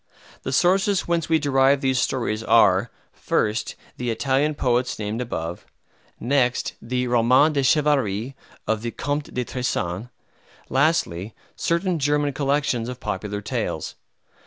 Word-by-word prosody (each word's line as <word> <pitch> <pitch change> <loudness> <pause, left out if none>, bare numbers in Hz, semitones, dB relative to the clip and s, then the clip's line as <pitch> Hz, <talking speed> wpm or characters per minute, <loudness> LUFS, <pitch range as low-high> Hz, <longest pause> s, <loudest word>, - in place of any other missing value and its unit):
The 130 - -4
sources 190 +6 +3
whence 170 -2 0
we 160 - +4
derive 140 -2 +3
these 130 -2 +1
stories 115 -5 -1
are, 100 -1 +4 0.2
first, 105 +2 -1 0.2
the 125 -1 -3
Italian 135 +5 +1
poets 125 -1 0
named 110 +2 -3
above; 85 -7 -4 0.6
next, 125 -1 +1
the 125 +2 -2
"Romans 125 +5 +4
de 140 - +1
Chevalerie" 135 -5 +1 0.3
of 110 -1 0
the 120 - -3
Comte 145 +4 -3
de 125 -1 -2
Tressan; 115 -5 -3 0.6
lastly, 125 - +1 0.2
certain 170 0 0
German 145 0 +1
collections 140 -4 0
of 125 0 -7
popular 105 +2 -4
tales. - - -3
130 Hz, 130 wpm, -23 LUFS, 115-145 Hz, 0.6 s, we